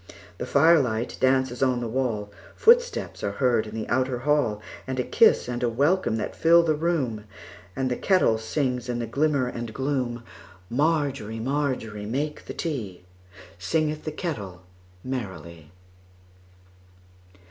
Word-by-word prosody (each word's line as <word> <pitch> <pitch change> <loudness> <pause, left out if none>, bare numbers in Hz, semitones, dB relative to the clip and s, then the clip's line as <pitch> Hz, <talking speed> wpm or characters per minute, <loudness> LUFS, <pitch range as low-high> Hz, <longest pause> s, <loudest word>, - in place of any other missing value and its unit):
The - - -4
firelight 140 -7 +3
dances 130 -1 +2
upon 130 -2 +2
the 120 - -3
wall, 110 -4 -2 0.2
Footsteps 485 +2 +3
are - - -1
heard 120 -5 +1
in 110 - -8
the 110 - -4
outer 130 0 0
hall, 135 -5 +1 0.3
And 130 -1 -3
a - - +2
kiss 225 - +4
and 120 -1 -3
a 120 - +2
welcome 140 +3 +1
that 110 - -4
fill 170 +1 +5
the 160 -2 +2
room, 150 -10 -1 0.5
And 130 -1 -1
the - - +1
kettle 180 - +2
sings 125 +1 -2
in 120 - -1
the 120 - -2
glimmer 140 +2 +1
and 120 -2 -6
gloom. 130 -4 -2 0.5
Margery, 140 -5 0
Margery, 125 -5 -2
make 145 +6 -3
the - - -7
tea, 110 - -4 0.6
Singeth 155 - -1
the 155 - -4
kettle 105 - -5 0.4
merrily. 95 - -6
130 Hz, 140 wpm, -25 LUFS, 115-150 Hz, 0.6 s, fill